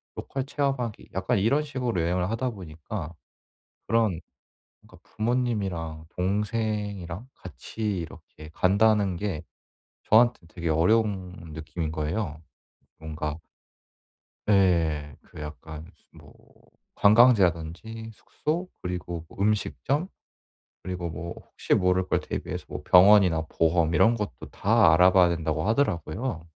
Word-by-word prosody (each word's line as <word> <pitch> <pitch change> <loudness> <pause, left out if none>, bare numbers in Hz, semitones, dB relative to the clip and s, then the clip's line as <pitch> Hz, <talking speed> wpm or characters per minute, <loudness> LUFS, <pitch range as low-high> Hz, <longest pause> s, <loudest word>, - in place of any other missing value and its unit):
로컬 135 -1 -4
체험하기 135 -6 -2
약간 95 +2 0
이런 140 +9 +2
식으로 125 - -2
여행을 90 +2 0
하다 125 +3 -1
보니까 85 -2 -7 0.7
그런 110 -7 +2 0.6
그러니까 - - -18
부모님이랑 100 -9 -2
동생이랑 105 0 -2
같이 90 +5 -11 0.2
이렇게 75 -1 -12
간다는 100 0 +3
게 90 -5 -3 0.6
저한테는 115 -6 +3
되게 85 -2 -4
어려운 90 -1 0
느낌인 80 +1 -5
거예요 80 +1 -3 0.6
뭔가. 80 0 -5 1.1
예. 80 -7 +2
그 - - -13
약간 75 +1 -8 0.3
무슨 - - -16
뭐 - - -16 0.6
관광지라든지 110 -1 +3
숙소 170 - -3
그리고 85 -2 -4
뭐 - - -17
음식점 130 - 0 0.8
그리고 90 -2 -4
뭐 85 +2 -6
혹시 - - -3
모를 90 0 +2
걸 - - +1
대비해서 - - -5
뭐 - - -6
병원이나 90 -3 +6
보험 80 0 +2
이런 115 +9 +5
것도 105 -2 -3 0.2
다 80 - +4
알아봐야 90 +1 +6
된다고 80 +1 -1
하더라고요. 105 - -1
90 Hz, 275 characters per minute, -26 LUFS, 80-110 Hz, 1.1 s, 병원이나